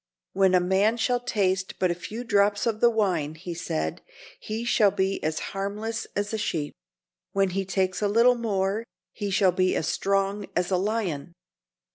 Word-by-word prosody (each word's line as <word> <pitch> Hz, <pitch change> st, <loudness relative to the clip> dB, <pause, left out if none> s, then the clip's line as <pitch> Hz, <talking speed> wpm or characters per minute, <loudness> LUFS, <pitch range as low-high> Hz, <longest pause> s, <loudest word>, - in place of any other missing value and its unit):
"When 190 Hz, -1 st, +4 dB
a -, -, +6 dB
man 190 Hz, +5 st, +2 dB
shall 245 Hz, +2 st, +1 dB
taste 190 Hz, -6 st, -1 dB
but 185 Hz, -2 st, +2 dB
a -, -, +1 dB
few 215 Hz, +7 st, -7 dB
drops 205 Hz, -2 st, +2 dB
of 225 Hz, -2 st, 0 dB
the 240 Hz, -, +6 dB
wine," 180 Hz, -9 st, 0 dB
he 170 Hz, +2 st, -6 dB
said, 80 Hz, -, -3 dB, 0.4 s
"he 220 Hz, +2 st, -4 dB
shall 220 Hz, -3 st, +4 dB
be 195 Hz, 0 st, -1 dB
as 155 Hz, 0 st, -1 dB, 0.2 s
harmless 210 Hz, +3 st, -3 dB
as 205 Hz, +1 st, -2 dB
a 220 Hz, -, -1 dB
sheep. 160 Hz, -8 st, -2 dB, 0.6 s
When 195 Hz, -1 st, +2 dB
he 195 Hz, +1 st, -1 dB
takes 185 Hz, 0 st, -1 dB
a 205 Hz, -, +2 dB
little 230 Hz, +4 st, +5 dB
more 210 Hz, -3 st, -1 dB, 0.3 s
he 205 Hz, -2 st, -3 dB
shall 190 Hz, -1 st, +3 dB
be 185 Hz, +1 st, +1 dB
as 160 Hz, -, -1 dB
strong 195 Hz, +1 st, 0 dB
as 180 Hz, +1 st, 0 dB
a 185 Hz, -, +3 dB
lion." 190 Hz, -7 st, -2 dB
195 Hz, 180 wpm, -26 LUFS, 185-215 Hz, 0.6 s, a